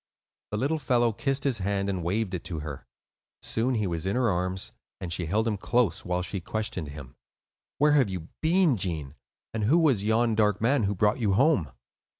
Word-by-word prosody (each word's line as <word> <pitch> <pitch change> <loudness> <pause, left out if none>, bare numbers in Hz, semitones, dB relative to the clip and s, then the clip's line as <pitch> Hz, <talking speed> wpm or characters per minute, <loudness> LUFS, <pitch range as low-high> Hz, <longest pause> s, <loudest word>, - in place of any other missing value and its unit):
The 105 - -3
little 145 +7 0
fellow 120 -4 +2
kissed 135 +4 -1
his 135 -6 +1
hand 100 +1 -1
and 95 -3 -2
waved 100 +3 -1
it 90 - -3
to 80 -4 -4
her. 75 -3 -7 0.6
Soon 125 +3 0
he 105 -2 0
was 85 -1 -2
in 100 - 0
her 125 -3 +2
arms; 90 +1 -2 0.3
and 85 -2 -3
she 85 -1 -1
held 110 +6 +1
him 105 -2 0
close, 120 0 +1
while 90 0 -1
she 95 +2 -4
questioned 95 -4 -3
him. 70 -3 -10 0.6
"Where 150 +1 +4
have 140 -7 +4
you 90 -3 -6
been, 165 -4 +3
Gene, 80 -7 -3 0.4
and 110 -2 -1
who 145 +10 +4
was 140 -12 +3
yon 110 +2 +2
dark 105 -2 +2
man 120 0 +2
who 100 +1 -1
brought 105 +5 +2
you 105 -5 +1
home?" 120 - +3
105 Hz, 200 wpm, -27 LUFS, 90-125 Hz, 0.6 s, Where